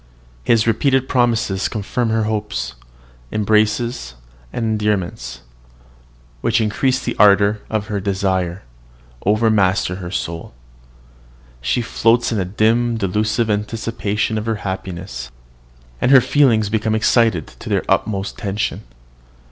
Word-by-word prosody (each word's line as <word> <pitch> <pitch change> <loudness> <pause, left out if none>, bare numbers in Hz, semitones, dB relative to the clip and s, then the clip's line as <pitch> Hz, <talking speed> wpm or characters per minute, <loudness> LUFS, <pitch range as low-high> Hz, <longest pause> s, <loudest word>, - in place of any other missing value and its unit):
His 110 - +3
repeated 130 +3 +2
promises 115 -7 +1
confirm 115 +3 -2
her 110 0 +1
hopes: 105 -2 -2 0.6
embraces 110 - +1 0.4
and 115 - -2
endearments, 105 -4 -2 1.0
which 115 0 +2
increase 125 +4 +1
the 120 - -3
ardour 105 0 +5
of 110 -2 -1
her 105 -1 -3
desires, 95 -2 -1 0.6
overmaster 105 -4 +2
her 90 -2 -6
soul. 85 -7 -5 1.1
She 65 - 0
floats 115 +1 +2
in 110 - 0
a 95 - 0
dim, 115 +5 +1
delusive 110 +3 0
anticipation 110 0 -1
of 110 - -6
her 115 - +1
happiness; 95 -6 -5 0.7
and - - +2
her 135 -1 +9
feelings 120 -7 +3
become 110 0 0
excited 110 -6 +2
to - - -8
their - - +1
utmost 100 +1 -1
tension. 105 -1 -2
110 Hz, 115 wpm, -19 LUFS, 100-115 Hz, 1.1 s, her